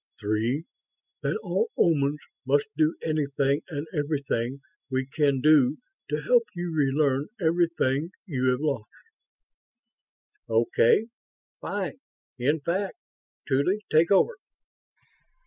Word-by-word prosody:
Three, 115 +9 -1 0.6
that - - 0
all 455 0 0
Omans 145 -3 +3 0.3
must 140 +2 +2
do 155 +1 +2
anything 140 -2 0
and 145 -2 -4
everything 140 -4 -2 0.3
we 130 0 -1
can 140 -1 +1
do 150 -2 +5 0.3
to - - -2
help 485 -2 +4
you 175 -1 -3
relearn 140 -1 +1
everything 165 -4 +1 0.2
you 135 -9 -2
have 125 +1 +2
lost." 140 -8 -1 1.6
"Okay. 115 - +3 0.5
Fine, - - -4 0.4
in 145 +5 +1
fact. 190 - -2 0.5
Tuly, 180 +10 +1
take 160 +2 +4
over." 475 - +3
145 Hz, 105 wpm, -26 LUFS, 135-165 Hz, 1.6 s, do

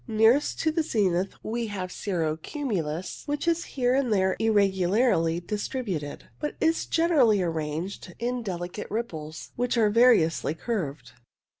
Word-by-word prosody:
Nearest 225 +5 +3
to 320 - +2
the 325 +1 +1
zenith 195 - 0
we 230 +1 -2
have 190 -3 -5
cirro 165 -7 -1
cumulus, 180 - -4
which 290 +3 -2
is 335 0 +2
here 250 -2 0
and 260 -3 +1
there 190 -2 +2
irregu 200 -5 +2
larly 175 -7 +2
distributed, 205 - -4
but 300 - -3
is 325 +1 +1
generally 295 - +4
arranged 165 +3 -4
in 245 +1 -2
deli 175 -5 -4
cate 210 +3 -7
ripples, 160 -9 -5
which 245 0 0
are 215 -2 +4
variously 210 -10 +4
curved. 155 - -4
210 Hz, 145 wpm, -26 LUFS, 170-245 Hz, -, generally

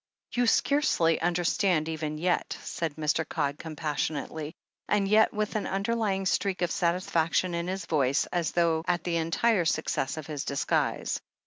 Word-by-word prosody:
"You 245 0 +2
scarcely 225 - +3
understand, 175 -1 +1
even 155 -1 -3
yet," 175 +3 0
said 160 -4 -3
Mr. 155 +1 0
Codd 145 -3 -2
compassionately, 155 0 -3 0.3
and 205 -2 +2
yet 215 +2 +5
with 215 0 -2
an 215 - -1
underlying 195 -1 0
streak 185 -1 0
of 175 - 0
satisfaction 170 0 +1
in 170 0 -2
his 190 -1 -3
voice, 140 -3 +2
as 170 -4 +1
though 165 -2 +2
at 175 -1 +1
the 170 -1 0
entire 170 +4 +2
success 155 -3 -1
of 155 - -5
his 150 -2 -4
disguise. 140 - -1
170 Hz, 150 wpm, -28 LUFS, 155-190 Hz, 0.3 s, yet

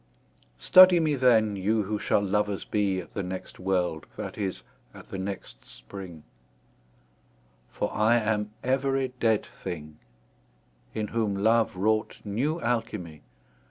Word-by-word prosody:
Study 185 - +8
me 155 -2 +1
then, 115 -6 +3
you 105 +3 +1
who 105 +1 -3
shall 100 - +1
lovers 100 0 -1
bee 100 -3 0
At - - -15
the 100 - -3
next 95 0 -7
world, 90 -4 -1
that - - -5
is, 95 -3 -4 0.3
at - - -13
the 95 - -5
next 95 0 -6
Spring: 90 -6 -10 1.5
For - - -3
I 110 +3 +3
am 105 -2 0
every 135 +1 +1
dead 110 -2 +2
thing, 75 -2 -8 1.0
In 105 -2 -2
whom 110 -3 0
love 110 +2 +2
wrought 110 +3 0
new 135 +11 -1
Alchimie. 105 -10 -3
105 Hz, 130 wpm, -27 LUFS, 95-115 Hz, 1.5 s, Study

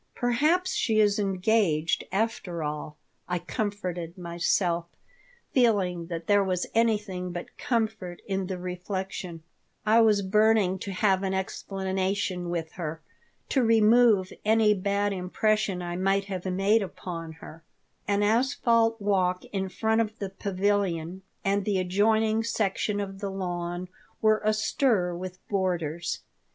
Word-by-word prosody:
"Perhaps 305 +10 +2
she 220 -2 +1
is 205 -1 +3
engaged, 185 -5 +1
after 190 -5 -1
all," 150 0 -5 0.3
I 180 - +1
comforted 180 -3 -4
myself, 170 0 0 0.6
feeling 190 -9 +2
that 165 -1 -5
there 205 +1 +4
was 185 -2 -1
anything 210 -5 0
but 175 0 -7
comfort 220 -7 -2
in 195 -2 -2
the 185 -1 -3
reflection 180 -1 -5 0.4
I 220 +2 +5
was 210 -3 +4
burning 210 -1 +3
to 195 - -5
have 190 0 +2
an 190 -1 -1
explanation 190 -1 -2
with 165 -2 -3
her, 160 -3 -5 0.5
to 265 - +2
remove 225 -3 +4
any 220 0 +4
bad 200 +1 0
impression 195 +1 0
I 175 0 -4
might 195 +1 +1
have 190 -2 -5
made 195 +4 +3
upon 170 -4 -6
her 160 0 -12 0.4
An 205 0 +2
asphalt 230 0 +2
walk 185 -3 +1
in 190 -1 -1
front 220 +4 +1
of 220 0 -3
the 200 -3 -5
pavilion 190 -3 -1 0.2
and 200 +1 +2
the 200 -1 0
adjoining 215 +4 +2
section 210 -2 -1
of 195 -1 -5
the 200 -1 -3
lawn 175 -1 -4 0.3
were 215 0 +3
astir 215 -3 +1
with 185 +1 -8
boarders. 175 -4 -1
195 Hz, 130 wpm, -27 LUFS, 180-215 Hz, 0.6 s, I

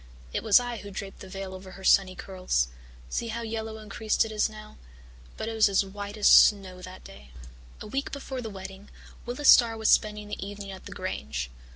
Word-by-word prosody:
It - - -1
was 215 +1 +6
I 245 -1 -4
who 205 -1 -9
draped 195 0 -7
the 190 - -10
veil 195 0 -6
over 185 0 -10
her 195 - -12
sunny 185 -1 +4
curls 185 - -1 0.4
see 230 - -3
how 230 +1 -4
yellow 220 -1 -4
and 215 -2 -11
creased 220 +1 +1
it 220 - -7
is 215 +1 +1
now, 215 0 -12 0.6
but - - -4
it 225 - -3
was 220 -2 +4
as 195 0 +2
white 205 +2 -7
as 210 - +3
snow 190 -3 +6
that 185 +1 -10
day. 65 +1 -13 0.5
"A - - -6
week 270 +6 -3
before 270 -2 -5
the 225 - -5
wedding, 195 0 -9 0.4
Willis 255 +4 -2
Starr 230 -2 +7
was 220 0 +1
spending 210 -1 +2
the 210 - -5
evening 200 0 -7
at 190 - -10
the - - -10
Grange. 65 -3 -4
205 Hz, 215 wpm, -27 LUFS, 190-220 Hz, 0.6 s, Starr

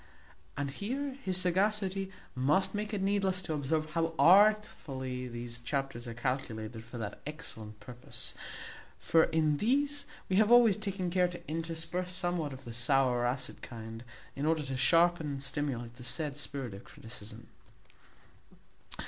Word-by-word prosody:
And 140 -1 -1
here 260 - -3
his 185 -4 +2
sagacity 190 +1 +1 0.2
must 150 +10 +2
make 210 +1 -2
it 200 -3 -1
needless 195 -2 +1
to 160 - -2
observe 155 +2 -1
how 165 0 0
artfully 165 -11 +4
these 120 -1 -5
chapters 135 -1 -3
are 115 - -6
calculated 115 -3 -3
for 115 +1 -9
that 105 -3 -5
excellent 110 -9 -6
purpose; 125 0 -6 0.6
for 165 -1 +4
in 155 -2 +2
these 285 - +1 0.2
we 185 - +1
have 215 +2 +5
always 240 -4 +8
taken 195 -4 -2
care 180 0 +4
to 175 0 -9
intersperse 165 +3 -3
somewhat 175 -4 -1
of 135 0 -9
the 120 - -7
sour 125 +1 +4
or 120 - +1
acid 130 +2 -2
kind, 115 -1 -8 0.3
in 145 +2 -1
order 160 -1 +2
to 135 -1 -3
sharpen 165 +5 +4
and 140 -1 -3
stimulate 125 -5 -2
the 125 - -10
said 145 +3 -1
spirit 140 -5 -5
of 100 - -9
criticism. 110 -2 -9
155 Hz, 150 wpm, -32 LUFS, 125-185 Hz, 0.6 s, always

